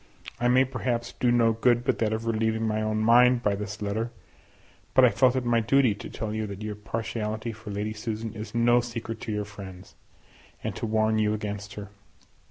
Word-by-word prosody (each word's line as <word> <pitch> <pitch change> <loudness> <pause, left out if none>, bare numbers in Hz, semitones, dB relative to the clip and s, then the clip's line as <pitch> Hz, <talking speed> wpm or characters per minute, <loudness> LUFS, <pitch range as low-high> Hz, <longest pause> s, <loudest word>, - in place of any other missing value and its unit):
I 120 - +2
may 130 +2 +5
perhaps 125 -2 -2
do 125 - +1
no 115 -2 +4
good 120 +1 +2
but - - 0
that 110 -2 +1
of 110 +1 -2
relieving 110 0 0
my 110 0 0
own 110 0 0
mind 125 +2 +5
by 105 - +2
this 105 +1 -5
letter, 110 +3 -1 0.9
but 130 - +8
I - - +6
felt 120 +4 +3
it 130 -1 -1
my 120 -1 +3
duty 125 0 +3
to 100 - -9
tell 110 -1 -4
you 110 0 -2
that 100 +1 -7
your 105 0 -3
partiality 110 +1 -4
for 110 -1 -10
Lady 105 +1 -3
Susan 110 0 -4
is 110 +1 -8
no 120 +1 +4
secret 115 -1 -6
to 110 - -4
your 105 -1 -2
friends, 95 -3 -11 0.7
and - - -3
to - - -3
warn 110 0 +2
you 105 0 +2
against 105 -1 -5
her. 105 -1 -7
110 Hz, 205 wpm, -27 LUFS, 105-120 Hz, 0.9 s, but